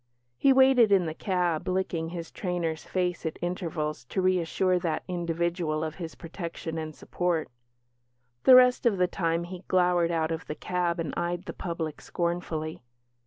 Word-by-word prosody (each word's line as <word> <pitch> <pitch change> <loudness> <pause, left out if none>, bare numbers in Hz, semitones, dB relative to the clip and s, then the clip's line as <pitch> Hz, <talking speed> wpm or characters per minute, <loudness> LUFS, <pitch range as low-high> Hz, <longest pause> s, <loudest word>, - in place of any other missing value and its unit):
He 275 - +4
waited 260 -4 +6
in 190 -3 +5
the 160 - -3
cab, 175 -3 -1
licking 185 -3 -1
his 170 -1 -6
trainer's 170 -4 -2
face 180 -1 -1
at 160 -2 -3
intervals 165 -6 -3
to 190 - -3
reassure 185 0 +2
that 165 -3 -2
individual 170 -2 -1
of 155 0 -4
his 165 -1 -6
protection 165 -1 -6
and 155 -1 -6
support; 175 -3 -1 1.0
the 255 - +10
rest 250 -1 +6
of 210 -4 +2
the 180 - +4
time 170 -2 -1
he 180 +1 -8
glowered 180 -2 +3
out 165 -1 0
of 165 0 -4
the 150 - -4
cab 175 0 -1
and 160 -4 -3
eyed 175 +1 -2
the - - -5
public 165 -3 -4
scornfully. 170 -2 -3
175 Hz, 165 wpm, -28 LUFS, 160-180 Hz, 1.0 s, the